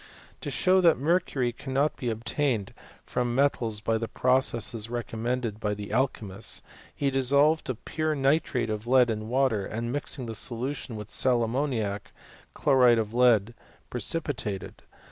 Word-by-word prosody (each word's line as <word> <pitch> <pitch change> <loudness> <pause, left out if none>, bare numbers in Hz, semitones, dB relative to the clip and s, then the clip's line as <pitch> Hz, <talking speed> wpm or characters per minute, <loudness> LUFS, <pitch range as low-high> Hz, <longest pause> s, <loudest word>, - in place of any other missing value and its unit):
»> - - -26
To - - -4
show 185 0 +3
that 170 -3 +5
mercury 140 -5 0
cannot 135 +4 -1
be 125 - -3
obtained 115 0 -1 0.3
from 120 -1 -2
me* 135 - +4
tals 110 -5 -5
by 115 0 +1
the 115 - -3
processes 115 -3 +1
recommended 120 -1 -3
by 105 -1 -1
the 100 0 -7
alch3naiist4 110 -6 -1 0.3
he 140 -1 0
dissolved 140 +4 +3 0.2
pure 155 -1 -1
nitrate 135 -4 +1
of 110 +2 -5
lead 125 -2 +4
in 110 0 -4
water, 125 -5 +1
and, 115 +4 -4
mixiii|^ 145 -2 -1
the 115 - -5
solution 125 +2 -3
with 105 0 -8
sal 125 -2 +3
ammoniac, 115 -5 -2 0.4
chloride 125 -4 +4
of 110 -1 -2
lead 120 -3 +3 0.4
precs^ 125 +7 0
pitated. 105 -10 -4
120 Hz, 150 wpm, -27 LUFS, 110-135 Hz, 0.4 s, that